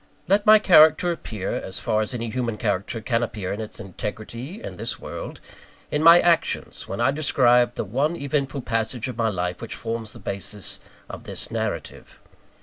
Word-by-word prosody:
Let 205 +2 +2
my 215 0 +10
character 175 -3 +6
appear 110 - -5
as 95 - -4
far 110 -2 0
as 110 - -2
any 115 -2 -4
human 120 -3 -2
character 105 +1 -2
can 115 +1 0
appear 105 -5 -3
in 105 - -4
its 110 - -7
integrity, 115 - -6
in - - -7
this - - -2
world - - -7 0.5
in 150 - 0
my 170 +2 +9
actions, 170 -2 +1
when 100 - -5
I 120 +3 +3
describe 125 -4 +3
the - - -3
one 140 - 0
eventful 140 -3 -2
passage 115 +1 -2
in 130 - -5
my 115 -1 +1
life 90 -3 -3
which 115 - -6
forms 115 -1 -4
the - - -10
basis 100 -1 -5 0.3
of - - -9
this - - -5
narrative. - - -4
120 Hz, 180 wpm, -24 LUFS, 110-145 Hz, 0.5 s, my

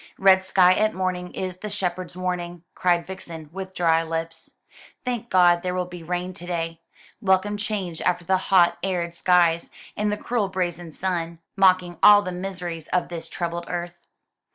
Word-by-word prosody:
"'Red 190 -1 +5
sky 185 -1 +5
at 215 +2 +1
morning 185 -1 -2
is 185 -1 -4
the 210 - -5
shepherd's 185 -3 -3
warning!'" 175 -2 -3
cried 175 -2 +1
Vixen, 165 -4 -9
with 190 0 -7
dry 165 -2 +3
lips. 165 0 -5 0.5
"Thank 240 -2 -3
God 175 -2 +5
there 180 0 -2
will 180 0 0
be 175 -1 -9
rain 180 +2 -3
to 175 0 -10
day! 165 -1 -3 0.4
Welcome 195 +1 +2
change 205 -6 -3
after 175 -1 0
the 190 +2 +3
hot 180 -3 +5
arid 175 -3 -2
skies, 170 -1 +3 0.3
and 210 0 0
the 210 - -1
cruel 220 -3 -1
brazen 175 -3 -3
sun, 170 -1 -3 0.2
mocking 185 -2 +3
all 205 0 +8
the 185 - -4
miseries 180 -3 -5
of 180 - 0
this 165 -1 -6
troubled 170 -1 -4
earth." 175 0 -5
180 Hz, 170 wpm, -24 LUFS, 170-190 Hz, 0.5 s, all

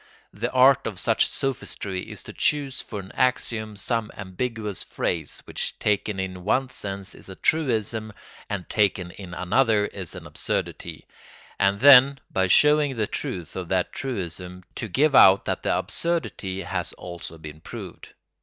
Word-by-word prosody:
The 115 +4 -2
art 130 0 +5
of 105 -4 -5
such - - +3
sophistry 100 -8 -3
is - - -7
to - - -9
choose 140 -3 0
for 105 - -6
an 95 - -12
axiom 115 -4 0
some 110 +2 -1
ambiguous 105 +1 -3
phrase - - -3
which - - -3
taken 105 -1 0
in 95 -1 -4
one 130 +6 +1
sense 100 -4 -5
is - - -10
a 95 - -8
truism 110 -8 0 0.4
and 100 -4 -4
taken 95 -4 +1
in 90 -2 -9
another 105 +4 +2
is 95 -5 -7
an - - -9
absurdity; - - -4 0.5
and 100 +1 +2
then, 135 0 +8
by 95 0 +2
showing 150 +5 +5
the 110 -2 0
truth 85 -4 -5
of 90 -2 -5
that 90 -1 0
truism, 90 -7 -5
to 115 - -4
give 140 +8 +2
out 95 -6 +7
that - - -2
the - - +1
absurdity 105 - -2
has - - -3
also 85 -2 -8
been 80 -1 -10
proved. - - -9
105 Hz, 155 wpm, -25 LUFS, 95-125 Hz, 0.5 s, then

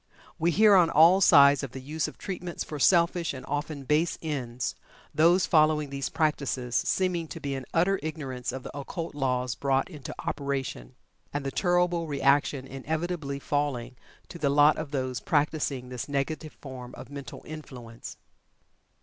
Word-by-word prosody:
We 165 - +2
hear 210 +4 +5
on 175 -3 +5
all 170 +6 +6
sides 140 -5 +7
of 135 -4 -6
the 130 - -6
use 150 +4 -3
of - - -10
"treatments" 180 -3 -5
for 150 - -7
selfish 170 0 +3
and 130 - -8
often 145 -1 -3
base 150 +5 +1
ends, 130 -6 -3 0.4
those 170 +4 +4
following 155 -2 +3
these 140 -1 -3
practices 140 -6 -1
seeming 180 -3 +1
to - - -8
be 140 -1 -3
in 135 -2 -5
utter 185 +4 +2
ignorance 135 -6 -4
of 130 0 -6
the - - -9
occult 160 +4 -5
laws 125 -3 -1
brought 135 +6 0
into 145 -5 -8
operation, 135 - -3 0.4
and 145 -1 -3
the 135 - -2
terrible 175 -1 +1
reaction 140 -1 +2
inevitably 155 +2 -3
falling 140 -4 -2 0.3
to 170 - -9
the 145 - +1
lot 145 +2 +5
of 155 -2 -5
those 130 -3 -2
practicing 145 -2 -1
this 125 +2 -6
negative 150 +3 -2
form 130 -3 -9
of 130 +3 -10
mental 140 -3 -8
influence. 125 -7 -9
145 Hz, 160 wpm, -27 LUFS, 135-160 Hz, 0.4 s, sides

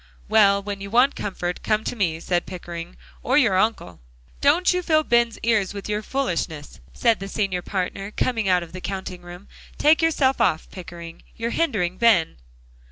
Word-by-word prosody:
"Well, 200 -2 +4
when 200 -1 -5
you 200 - -6
want 250 +6 +3
comfort, 180 -3 -4
come 215 0 0
to 245 - -3
me," 170 -7 -1
said 175 +1 -1
Pickering, 175 -1 -8 0.2
"or 255 +3 +1
your 230 -10 +4
uncle!" 190 - 0 0.4
"Don't 330 +6 +4
you 360 - 0
fill 310 -3 +2
Ben's 235 -3 +2
ears 210 -4 +1
with 200 - -6
your 210 0 -1
foolishness," 170 - -3
said 230 -3 +2
the 195 - -6
Senior 195 -3 -2
Partner, 195 +1 -3
coming 225 -2 -1
out 180 -1 +3
of 170 - -13
the 185 - -7
counting 190 -2 -5
room. 175 +3 -11 0.3
"Take 310 +3 +4
yourself 280 -6 +2
off, 160 -8 +1
Pickering; 170 -2 -10
you're 230 +1 -3
hindering 195 - -1
Ben." 210 - +3
200 Hz, 175 wpm, -23 LUFS, 180-235 Hz, 0.4 s, Well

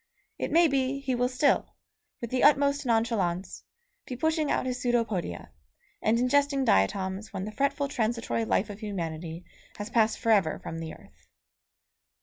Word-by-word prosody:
It - - -2
may 340 +1 +6
be 270 -1 0
he 270 -2 -2
will 245 0 +1
still, 265 +3 +1 0.5
with 235 - -5
the 255 - 0
utmost 285 -1 +4
nonchalance, 200 -6 0 0.4
be 255 - -5
pushing 315 +3 0
out - - 0
his 250 -1 -2
pseudopodia, 225 - -1 0.5
and 220 +2 +2
ingesting 275 +2 +2
diatoms 190 - +1
when 190 - -4
the 215 - -5
fretful 280 +3 0
transitory 230 -3 -1
life 210 -1 0
of 205 - -10
humanity 170 -5 -5 0.3
has 210 +2 -6
passed 225 -2 +3
altogether 205 -9 +2
from 165 - -7
the 160 -1 -6
earth. - - -21
230 Hz, 150 wpm, -28 LUFS, 195-270 Hz, 0.5 s, may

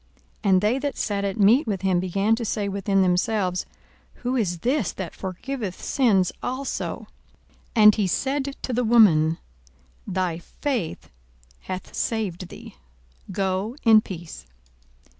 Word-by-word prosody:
42:007:049 200 - +1
And 185 -1 +5
they 220 +6 +2
that 285 0 -3
sat 200 -2 -1
at 195 +1 -3
meat 225 +8 +5
with 195 -3 -2
him 185 -2 +2
began 195 +4 +1
to 230 - -4
say 210 -2 -1
within 195 0 +1
themselves, 185 0 0 0.5
Who 250 +1 -3
is 190 -8 0
this 255 - +1
that 190 -3 -6
forgiveth 195 +2 -5
sins 205 -9 +2
also? 260 +2 -3 0.7
42:007:050 220 - +5
And 210 0 +9
he 205 -3 +1
said 275 +7 -1
to 255 - -2
the 245 +1 +1
woman, 175 -9 +5 0.7
Thy 180 -3 -1
faith 240 - -4 0.5
hath 185 0 -7
saved 200 -6 -2
thee; - - -12 0.5
go 195 +4 -1
in 220 -2 +7
peace. 175 - -9
200 Hz, 140 wpm, -24 LUFS, 185-235 Hz, 0.7 s, And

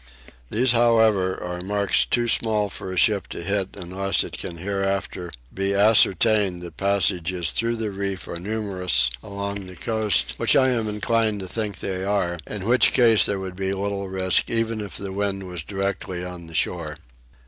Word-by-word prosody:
These 125 +3 +2
however 110 -5 +3
are 90 0 -4
marks 100 +1 +1
too 120 -1 0
small 110 -3 +2
for 95 - -7
a 95 - -5
ship 105 -3 +3
to - - -7
hit 100 +1 -1
unless 95 +1 0
it - - -7
can 85 - -5
hereafter 95 -1 -2 0.2
be 95 +1 -1
ascertained 100 -2 +4
that 85 - -9
passages 90 -3 +1
through 115 +1 0
the 110 -2 -3
reef 100 -1 -4
are 85 - -5
numerous 95 - 0
along 100 -1 -5
the 90 - -10
coast 105 +4 0
which - - +3
I 130 -1 +5
am 115 -4 0
inclined 110 0 0
to 95 - -6
think 105 +1 -4
they 95 -1 -3
are, 95 -4 0
in 100 -3 -5
which 125 +3 +4
case 115 -4 +5
there 100 - -1
would 95 -1 -6
be 95 0 -2
little 100 0 -3
risk 95 -1 +1
even 115 -1 -1
if 105 - -5
the 100 -1 -5
wind 100 -1 -2
was 90 -3 -5
directly 95 0 -3
on 90 -2 -8
the 80 - -11
shore. 80 -3 -1
100 Hz, 180 wpm, -23 LUFS, 90-105 Hz, 0.2 s, I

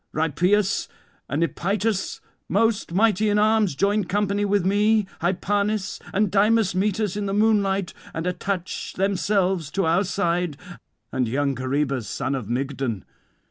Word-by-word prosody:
Rhipeus 180 +6 +1 0.4
and 145 +5 0
Epytus, 195 - -1 0.3
most 220 +1 +1
mighty 210 +2 +3
in 205 - +2
arms, 215 -5 +3
join 200 +4 +1
company 205 +2 0
with 200 -2 +1
me; 210 +2 +3 0.2
Hypanis 200 +3 0
and 205 -1 +1
Dymas 210 0 +3
meet 195 +3 0
us 210 -3 -1
in 205 -1 -2
the 195 - -1
moonlight 200 -3 +2 0.2
and 165 +1 -4
attach 180 0 -3
themselves 190 -3 0
to 195 +5 -1
our 170 +4 +3
side, 175 -5 -1 0.5
and 130 -2 0
young 140 +4 0
Coroebus 130 -1 -1
son 135 0 -2
of 125 -6 -4
Mygdon. 130 -4 -2
195 Hz, 140 wpm, -24 LUFS, 160-205 Hz, 0.5 s, mighty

